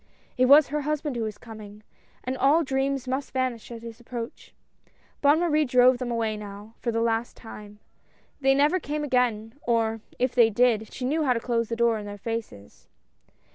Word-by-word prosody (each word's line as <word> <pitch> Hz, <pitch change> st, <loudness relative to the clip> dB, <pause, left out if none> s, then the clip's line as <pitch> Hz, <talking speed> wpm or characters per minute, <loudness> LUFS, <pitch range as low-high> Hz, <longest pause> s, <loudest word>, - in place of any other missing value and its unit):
It 255 Hz, -, +3 dB
was 285 Hz, +3 st, +7 dB
her 300 Hz, +1 st, -1 dB
husband 295 Hz, -1 st, -2 dB
who 235 Hz, -, -2 dB
was 215 Hz, -2 st, -4 dB
coming 215 Hz, -2 st, -11 dB, 0.2 s
— -, -, -35 dB
and 255 Hz, +1 st, -3 dB
all 285 Hz, +6 st, +3 dB
dreams 270 Hz, -1 st, -1 dB
must 265 Hz, +2 st, -2 dB
vanish 255 Hz, -3 st, -2 dB
at 230 Hz, -1 st, -9 dB
his 230 Hz, 0 st, -9 dB
approach. 240 Hz, 0 st, -8 dB, 0.7 s
Bonne 290 Hz, +2 st, +5 dB
Marie 310 Hz, -3 st, +2 dB
drove 250 Hz, -1 st, +4 dB
them 250 Hz, -1 st, -3 dB
away 225 Hz, -2 st, -1 dB
now 205 Hz, +1 st, -9 dB
for 235 Hz, -, -2 dB
the 230 Hz, 0 st, -1 dB
last 230 Hz, 0 st, -1 dB
time. 210 Hz, -2 st, -11 dB, 0.6 s
They 270 Hz, -1 st, +3 dB
never 295 Hz, +6 st, +3 dB
came 300 Hz, -1 st, -4 dB
again, 240 Hz, -5 st, 0 dB
or, 225 Hz, -2 st, 0 dB, 0.2 s
if 250 Hz, 0 st, 0 dB
they 235 Hz, -3 st, +5 dB
did, 225 Hz, -1 st, +1 dB
she 255 Hz, -, -5 dB
knew 310 Hz, +5 st, 0 dB
how 260 Hz, -4 st, +3 dB
to 235 Hz, -, -2 dB
close 230 Hz, -1 st, -1 dB
the 230 Hz, -, -2 dB
door 235 Hz, -1 st, +2 dB
in 205 Hz, -, -8 dB
their 205 Hz, 0 st, -7 dB
faces. 215 Hz, -, -7 dB
240 Hz, 195 wpm, -26 LUFS, 225-270 Hz, 0.7 s, was